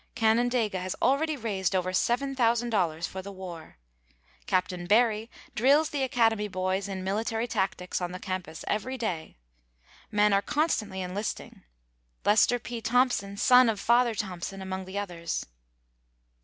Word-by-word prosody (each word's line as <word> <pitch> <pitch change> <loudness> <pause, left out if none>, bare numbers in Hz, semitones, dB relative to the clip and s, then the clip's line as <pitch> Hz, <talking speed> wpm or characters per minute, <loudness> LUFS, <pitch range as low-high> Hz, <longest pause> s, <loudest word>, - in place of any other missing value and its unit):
Canandaigua 225 -2 +2
has 185 0 -3
already 300 +3 +2
raised 195 -6 -1
over 185 0 0
$7,000 235 - +1
for 190 - -6
the 200 +1 -8
war. 180 - -9 0.7
Capt. 185 0 +1
Barry 220 +1 +3 0.2
drills 285 +7 +3
the 285 - -2
Academy 225 -5 +2
boys 185 0 -1
in 190 -2 -5
military 225 +4 -1
tactics 190 -6 -2
on 175 0 -2
the 185 - -5
campus 185 -3 -5
every 255 +5 -2
day. 180 - -4 0.7
Men 210 -1 +3
are 195 - +4
constantly 215 - -1
enlisting. 185 +4 -5 0.6
Lester 215 +4 +4
P. 235 -1 -6
Thompson, 235 -5 +1
son 250 +2 +6
of 215 -3 -1
"Father 235 +1 +3
Thompson," 195 -1 -4
among 190 0 -5
the 190 +2 -7
others. 175 -4 -3
210 Hz, 135 wpm, -28 LUFS, 185-240 Hz, 0.7 s, son